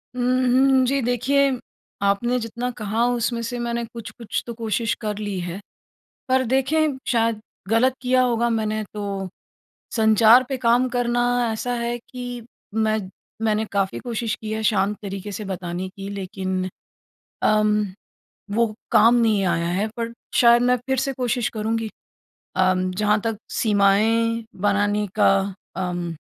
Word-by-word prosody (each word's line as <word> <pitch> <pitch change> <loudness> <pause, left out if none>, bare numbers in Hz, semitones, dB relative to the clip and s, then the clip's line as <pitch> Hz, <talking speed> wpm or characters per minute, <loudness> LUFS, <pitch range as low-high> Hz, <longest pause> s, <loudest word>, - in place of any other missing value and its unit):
उम, 250 - -2
हम्म। 255 +1 +4
जी 275 +2 +1
देखिए, 265 +3 +2 0.5
आपने 200 +5 +1
जितना 235 +2 -4
कहा 220 +1 0
उसमें 240 -1 0
से 245 - -4
मैंने 235 0 -2
कुछ-कुछ 230 0 -6
तो 235 - -4
कोशिश 225 0 -1
कर 210 -2 -3
ली 205 -3 -3
है। 175 +1 -5 0.7
पर 260 0 +3
देखें 270 +4 +1
शायद 230 -2 +1 0.3
ग़लत 240 +4 +3
किया 255 0 +3
होगा 235 -1 +2
मैंने 215 -1 -1
तो 200 -2 -4 0.7
संचार 220 +2 +6
पे 270 - -1
काम 240 +2 +4
करना 240 -1 0 0.3
ऐसा 245 +3 -3
है 235 0 -2
कि 245 0 -7 0.3
मैं 220 0 +2 0.4
मैंने 215 0 +1
काफ़ी 195 -1 0
कोशिश 230 -3 -2
की 215 -1 -5
है 220 0 -2
शांत 210 -1 +2
तरीके 200 0 -5
से 210 +2 -5
बताने 185 -1 -4
की 195 +1 -8
लेकिन 190 -1 -3 0.7
अम, 215 0 +3 0.7
वो 225 +1 +1 0.2
काम 230 +2 +6
नहीं 220 -4 +3
आया 170 -1 +1
है 190 +5 0
पर 230 0 -3 0.2
शायद 235 0 +6
मैं 250 +1 +4
फ़िर 265 +2 -2
से 270 +1 -1
कोशिश 245 -2 -1
करूँगी। 225 0 -2 0.7
अम, 185 0 +2
जहाँ 210 +3 +2
तक 225 -1 -2
सीमाएँ 225 +2 +2 0.2
बनाने 205 +1 +2
का 210 - +5 0.4
अम, 175 -2 -3
225 Hz, 145 wpm, -23 LUFS, 205-245 Hz, 0.7 s, संचार